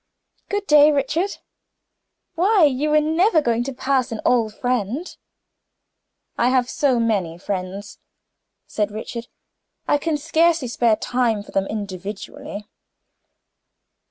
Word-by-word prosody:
"Good 410 Hz, 0 st, -2 dB
day, 300 Hz, -2 st, +6 dB
Richard. 300 Hz, +7 st, -1 dB, 1.0 s
Why! 385 Hz, +2 st, +3 dB
you 290 Hz, +1 st, +2 dB
were 305 Hz, 0 st, +5 dB
never 325 Hz, +4 st, +3 dB
going 235 Hz, -4 st, 0 dB
to 275 Hz, -, -3 dB
pass 260 Hz, -1 st, 0 dB
an 225 Hz, -, -4 dB
old 230 Hz, -3 st, +2 dB
friend?" 250 Hz, -, -2 dB, 1.2 s
"I 245 Hz, -, +3 dB
have 255 Hz, -1 st, +2 dB
so 260 Hz, -2 st, +1 dB
many 200 Hz, -8 st, 0 dB
friends," 195 Hz, +2 st, -5 dB, 0.7 s
said 210 Hz, -1 st, -2 dB
Richard, 230 Hz, +2 st, -6 dB, 0.6 s
"I 290 Hz, -, +3 dB
can 315 Hz, 0 st, -1 dB
scarcely 320 Hz, -2 st, +1 dB
spare 235 Hz, -2 st, +2 dB
time 235 Hz, -3 st, 0 dB
for -, -, -14 dB
them 195 Hz, 0 st, 0 dB
individually." 205 Hz, 0 st, -6 dB
250 Hz, 120 wpm, -21 LUFS, 215-300 Hz, 1.2 s, day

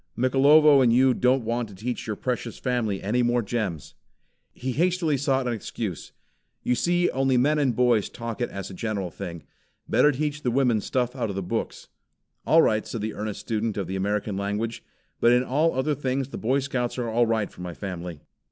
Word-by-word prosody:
Mikelovo 140 Hz, +3 st, +6 dB
and 120 Hz, -3 st, +4 dB
you 130 Hz, +2 st, +5 dB
don't 125 Hz, 0 st, +2 dB
want 115 Hz, 0 st, -1 dB
to 100 Hz, -, -12 dB
teach 120 Hz, +6 st, -4 dB
your 110 Hz, -, -2 dB
precious 120 Hz, -2 st, -3 dB
family 120 Hz, -6 st, -1 dB
any 115 Hz, +6 st, +1 dB
more 120 Hz, 0 st, +2 dB
gems." 100 Hz, -, -3 dB, 0.6 s
He 130 Hz, +2 st, -4 dB
hastily 170 Hz, +1 st, +1 dB
sought 135 Hz, -1 st, 0 dB
an 120 Hz, -, 0 dB
excuse. 105 Hz, -4 st, -5 dB, 0.5 s
"You 125 Hz, -, +1 dB
see 175 Hz, +6 st, +1 dB
only 135 Hz, -1 st, +2 dB
men 150 Hz, +5 st, +3 dB
and 130 Hz, -5 st, +1 dB
boys 120 Hz, -4 st, +2 dB
talk 115 Hz, 0 st, -6 dB
it 120 Hz, -, 0 dB
as 100 Hz, -1 st, -6 dB
a -, -, -8 dB
general 100 Hz, -2 st, -3 dB
thing. 85 Hz, -4 st, -7 dB, 0.4 s
Better 150 Hz, -, +4 dB
teach 150 Hz, +2 st, -2 dB
the 125 Hz, -, 0 dB
women 120 Hz, -3 st, +2 dB
stuff 125 Hz, +2 st, -1 dB
out 120 Hz, -4 st, -2 dB
of 100 Hz, -, -4 dB
the 95 Hz, -, -3 dB
books." -, -, -4 dB, 0.6 s
"All 165 Hz, +1 st, +6 dB
right," 110 Hz, 0 st, +1 dB
said 115 Hz, -, -4 dB
the 110 Hz, 0 st, -3 dB
earnest 105 Hz, -1 st, -5 dB
student 110 Hz, -1 st, -2 dB
of 100 Hz, -, -1 dB
the 95 Hz, +3 st, -4 dB
American 100 Hz, +1 st, -1 dB
language, 105 Hz, +4 st, -3 dB, 0.4 s
"but 120 Hz, -, +5 dB
in 125 Hz, +1 st, +3 dB
all 150 Hz, +5 st, +1 dB
other 135 Hz, +4 st, +1 dB
things 135 Hz, -1 st, -2 dB
the -, -, -6 dB
Boy 130 Hz, +5 st, +1 dB
Scouts 130 Hz, -3 st, -2 dB
are 120 Hz, -2 st, -2 dB
all 115 Hz, +1 st, +2 dB
right 110 Hz, -2 st, 0 dB
for -, -, -13 dB
my 90 Hz, -2 st, -6 dB
family." 90 Hz, -5 st, -6 dB
120 Hz, 205 wpm, -25 LUFS, 105-130 Hz, 0.6 s, Mikelovo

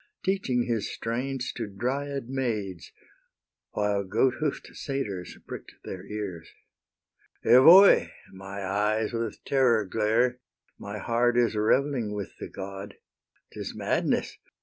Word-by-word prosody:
Teaching 185 Hz, -11 st, +1 dB
his 115 Hz, -4 st, -2 dB
strains 125 Hz, +2 st, -3 dB
to -, -, -4 dB
Dryad 135 Hz, +6 st, -3 dB
maids, 110 Hz, -9 st, -3 dB, 0.8 s
While 105 Hz, -1 st, 0 dB
goat 125 Hz, +7 st, +2 dB
hoof'd 150 Hz, -2 st, -3 dB
satyrs 105 Hz, -, -4 dB
prick'd -, -, -9 dB
their -, -, -7 dB
ears. 95 Hz, -6 st, -5 dB, 1.0 s
Evoe! 170 Hz, +11 st, +8 dB, 0.3 s
my 95 Hz, +1 st, -7 dB
eyes 105 Hz, +3 st, 0 dB
with 115 Hz, -2 st, -3 dB
terror 125 Hz, -6 st, +3 dB
glare; 115 Hz, +5 st, +1 dB, 0.4 s
My 100 Hz, +1 st, -6 dB
heart 120 Hz, +3 st, +1 dB
is 120 Hz, -2 st, +3 dB
revelling 115 Hz, +1 st, +1 dB
with 100 Hz, -2 st, -6 dB
the -, -, -6 dB
god; 95 Hz, +1 st, -7 dB, 0.6 s
'Tis -, -, -6 dB
madness! -, -, -1 dB
115 Hz, 115 wpm, -27 LUFS, 100-130 Hz, 1.0 s, Evoe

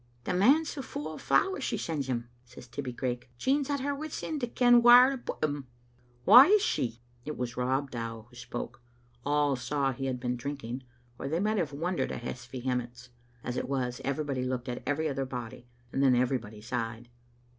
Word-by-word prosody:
" -, -, -35 dB
" -, -, -34 dB
The 180 Hz, -, -2 dB
manse 275 Hz, -, +4 dB
is -, -, -4 dB
fu* 150 Hz, -, -5 dB
o' 155 Hz, -, -6 dB
the -, -, -8 dB
flowers 380 Hz, -, +2 dB
she 225 Hz, -, -1 dB
sends 155 Hz, -8 st, -3 dB
him," 120 Hz, -2 st, -2 dB, 0.2 s
said 125 Hz, -, -13 dB
Tibbie 140 Hz, -3 st, -4 dB
Craik. 125 Hz, 0 st, -3 dB
" -, -, -33 dB
Jean's 275 Hz, -, +1 dB
at 285 Hz, -2 st, 0 dB
her 285 Hz, +1 st, -1 dB
wits' 310 Hz, +2 st, -5 dB
end 305 Hz, -3 st, -3 dB
to 245 Hz, -, 0 dB
ken 245 Hz, 0 st, +5 dB
whaur 245 Hz, +2 st, +9 dB
to 270 Hz, -, -3 dB
put -, -, -6 dB
them 145 Hz, -3 st, -1 dB, 0.6 s
a*." -, -, +1 dB
"Whaisshe?" 270 Hz, -, +7 dB, 0.3 s
It 150 Hz, +3 st, -5 dB
was 120 Hz, -1 st, -3 dB
Rob 130 Hz, +2 st, 0 dB
Dow 115 Hz, -2 st, -5 dB
who 120 Hz, -, -20 dB
spoke. 120 Hz, -1 st, -6 dB, 0.4 s
All 145 Hz, -1 st, +2 dB
saw 135 Hz, +3 st, 0 dB
he 135 Hz, +1 st, -4 dB
had 125 Hz, -1 st, -2 dB
been 125 Hz, 0 st, -2 dB
drinking, 130 Hz, -1 st, -5 dB, 0.3 s
or -, -, -4 dB
they 160 Hz, +4 st, 0 dB
might 215 Hz, +2 st, +1 dB
have 160 Hz, -5 st, -1 dB
wondered 170 Hz, +5 st, -2 dB
at -, -, -5 dB
his 125 Hz, +1 st, -6 dB
vehe 125 Hz, 0 st, -2 dB
mence. 125 Hz, +1 st, -6 dB, 0.3 s
As 125 Hz, -, -3 dB
it -, -, -3 dB
was, 125 Hz, -3 st, -2 dB
everybody 140 Hz, -2 st, -1 dB
looked 125 Hz, 0 st, -3 dB
at 125 Hz, -1 st, -4 dB
every 155 Hz, +2 st, 0 dB
other 135 Hz, -2 st, -2 dB
body, 125 Hz, -1 st, -7 dB, 0.3 s
and 135 Hz, -, +1 dB
then 130 Hz, -2 st, +5 dB
everybody 120 Hz, -4 st, -1 dB
sighed. 115 Hz, 0 st, -4 dB
135 Hz, 215 wpm, -29 LUFS, 125-170 Hz, 0.6 s, whaur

